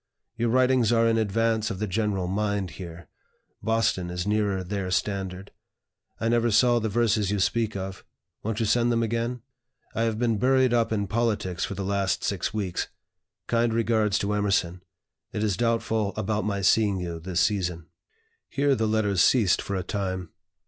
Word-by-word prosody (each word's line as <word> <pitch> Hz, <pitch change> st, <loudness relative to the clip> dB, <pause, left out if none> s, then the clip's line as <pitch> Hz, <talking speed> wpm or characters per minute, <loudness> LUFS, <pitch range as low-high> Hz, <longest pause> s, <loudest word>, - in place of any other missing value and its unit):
Your 115 Hz, 0 st, 0 dB
writings 125 Hz, -2 st, +3 dB
are 115 Hz, -1 st, +4 dB
in 115 Hz, 0 st, +2 dB
advance 110 Hz, +1 st, +1 dB
of 100 Hz, -, -4 dB
the 105 Hz, -, -1 dB
general 100 Hz, -1 st, -1 dB
mind 100 Hz, -1 st, -1 dB
here; 85 Hz, -3 st, -9 dB, 0.5 s
Boston 110 Hz, -5 st, 0 dB
is 90 Hz, +1 st, -3 dB
nearer 105 Hz, -2 st, 0 dB
their 95 Hz, 0 st, -3 dB
standard. 95 Hz, 0 st, -2 dB, 0.7 s
I 115 Hz, -, -1 dB
never 120 Hz, 0 st, +2 dB
saw 120 Hz, +2 st, +4 dB
the 110 Hz, -1 st, -2 dB
verses 105 Hz, -2 st, +1 dB
you 105 Hz, 0 st, 0 dB
speak 110 Hz, +2 st, 0 dB
of. 95 Hz, -1 st, -5 dB, 0.4 s
Won't 110 Hz, 0 st, -3 dB
you 115 Hz, -, +1 dB
send 120 Hz, +3 st, +2 dB
them 115 Hz, 0 st, +1 dB
again? 115 Hz, +1 st, -2 dB, 0.5 s
I -, -, -1 dB
have 115 Hz, -1 st, 0 dB
been 115 Hz, -2 st, +1 dB
buried 130 Hz, 0 st, +3 dB
up 115 Hz, -2 st, +2 dB
in 105 Hz, -2 st, 0 dB
politics 105 Hz, -4 st, -1 dB
for 100 Hz, -, -5 dB
the 100 Hz, 0 st, -4 dB
last 100 Hz, -1 st, 0 dB
six 100 Hz, -4 st, -1 dB
weeks. 100 Hz, -5 st, -2 dB, 0.6 s
Kind 115 Hz, -1 st, +1 dB
regards 110 Hz, -3 st, +2 dB
to 100 Hz, +1 st, -1 dB
Emerson. 100 Hz, -4 st, 0 dB, 0.5 s
It 105 Hz, -, -1 dB
is 105 Hz, -4 st, +1 dB
doubtful 110 Hz, -1 st, 0 dB
about 110 Hz, 0 st, -1 dB
my 100 Hz, -1 st, -1 dB
seeing 100 Hz, 0 st, +3 dB
you 85 Hz, -2 st, -4 dB
this 85 Hz, 0 st, -1 dB
season." 90 Hz, -5 st, 0 dB, 0.6 s
Here 140 Hz, 0 st, +2 dB
the 110 Hz, -4 st, 0 dB
letters 105 Hz, -4 st, +1 dB
ceased 110 Hz, -8 st, +4 dB
for 100 Hz, -, -4 dB
a 95 Hz, -, -2 dB
time. 95 Hz, -2 st, -3 dB
105 Hz, 175 wpm, -26 LUFS, 95-115 Hz, 0.7 s, are